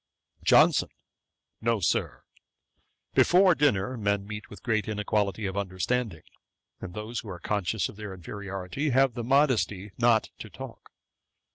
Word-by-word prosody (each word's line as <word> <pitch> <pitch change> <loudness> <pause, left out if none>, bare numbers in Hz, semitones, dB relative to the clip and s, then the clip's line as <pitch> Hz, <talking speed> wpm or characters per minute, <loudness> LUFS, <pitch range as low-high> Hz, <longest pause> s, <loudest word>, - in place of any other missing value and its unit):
JOHNSON. - - +5 0.7
'No, 115 -1 +1
Sir: 90 - -1 0.9
before 185 +1 +5
dinner 130 -6 +1
men 100 -2 0
meet 105 +1 -7
with 105 - -12
great 110 -3 0
inequality 105 -1 -1
of 95 -1 -3
understanding; 100 0 -2 0.6
and 90 -1 -8
those 110 +2 -4
who 110 - -8
are 90 - -6
conscious 105 +3 -1
of 100 - -12
their 105 -2 -6
inferiority, 95 - -4
have 135 -1 +3
the 120 0 -4
modesty 120 -7 +2
not 115 -2 +3
to - - -8
talk. - - -10
105 Hz, 135 wpm, -27 LUFS, 100-120 Hz, 0.9 s, JOHNSON